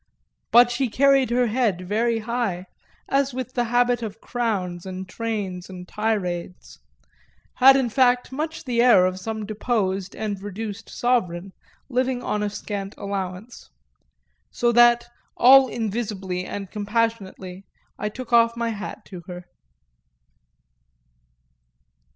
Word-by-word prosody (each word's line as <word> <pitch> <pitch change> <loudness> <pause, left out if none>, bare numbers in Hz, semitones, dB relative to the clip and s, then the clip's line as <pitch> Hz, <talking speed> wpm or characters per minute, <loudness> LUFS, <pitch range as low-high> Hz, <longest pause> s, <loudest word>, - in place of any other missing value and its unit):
But 240 +1 +6
she 245 +1 0
carried 275 +2 +3
her 245 +1 +2
head 215 -6 0
very 225 +3 +1
high, 220 -5 -2 0.4
as 275 -1 +1
with 255 0 -5
the 245 -1 0
habit 245 0 +2
of 220 -1 -6
crowns 195 -9 -2
and 190 0 -7
trains 195 -4 -4
and 180 -1 -9
tirades 175 - -3 0.8
had 265 +1 +8
in 265 -2 +2
fact 245 +1 +2
much 310 +4 -4
the 240 -2 +1
air 235 -7 +6
of 185 0 -2
some 220 +2 -4
deposed 200 -3 -2
and 205 -3 -4
reduced 205 +2 -6
sovereign 195 -7 -1 0.3
living 255 -1 -1
on 210 - -1
a 210 - 0
scant 200 -1 -6
allowance; 200 +2 -6 0.8
so 240 0 +1
that, 240 0 +5 0.3
all 265 +2 +8
invisibly 200 -6 -3
and 195 -1 -6
compassionately, 205 -3 -2 0.4
I 210 - -2
took 245 +2 -8
off 230 0 +4
my 235 0 -1
hat 210 -2 -6
to 180 -3 -9
her. 180 -1 -8
220 Hz, 125 wpm, -23 LUFS, 190-240 Hz, 0.8 s, had